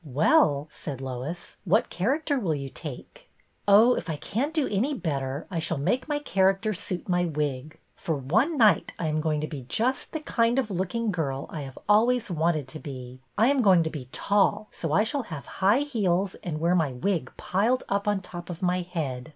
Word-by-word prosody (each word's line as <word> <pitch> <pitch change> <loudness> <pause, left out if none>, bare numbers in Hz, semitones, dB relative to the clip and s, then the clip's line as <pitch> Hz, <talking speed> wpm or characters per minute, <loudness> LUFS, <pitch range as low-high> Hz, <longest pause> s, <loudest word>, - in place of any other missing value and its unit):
" - - -35
Well," 145 0 +3
said 140 -4 -6
Lois, 135 +6 -6
" - - -42
what 205 +4 +2
character 280 - 0
will 170 -9 0
you 140 -1 -5
take? - - -9
" - - -42
" - - -41
Oh, 215 +5 +7
if - - -4
I 160 - -1
can't 240 - -2
do 310 -4 +1
any 240 +9 0
better 140 - -3
I 170 - -1
shall 160 0 -1
make 245 - 0
my 295 -1 0
character 195 -5 +1
suit 180 -2 -4
my 175 -1 +2
wig. 150 -2 -3 0.2
For 160 - -2
one 220 - +1
night 215 -5 +4
I 170 - -3
am 155 0 0
going 155 -1 0
to 155 - -2
be 145 -4 -6
just 255 +4 0
the 315 - -3
kind 235 -4 +1
of 250 -6 0
looking 195 +5 -1
girl 140 -7 -2
I 155 - -5
have 135 -1 -8
always 225 +1 +3
wanted 160 -4 0
to 155 - -8
be. 130 -4 -8 0.2
I 225 +5 +5
am 280 -2 +3
going 185 -6 +5
to 160 - -3
be 130 -5 -7
tall, 205 +1 +1
so 165 - -4
I 195 +7 +4
shall 280 +5 -1
have 150 -6 -6 0.2
high 205 +8 +5
heels 200 -9 0
and 155 -4 -3
wear 170 +2 +2
my 160 -7 +1
wig 150 +2 -1
piled 225 +7 +1
up 200 +1 -1
on 205 -2 +1
top 175 -1 -9
of 175 +1 -6
my 180 0 +2
head. 155 -7 -4
180 Hz, 215 wpm, -27 LUFS, 150-220 Hz, 0.2 s, Oh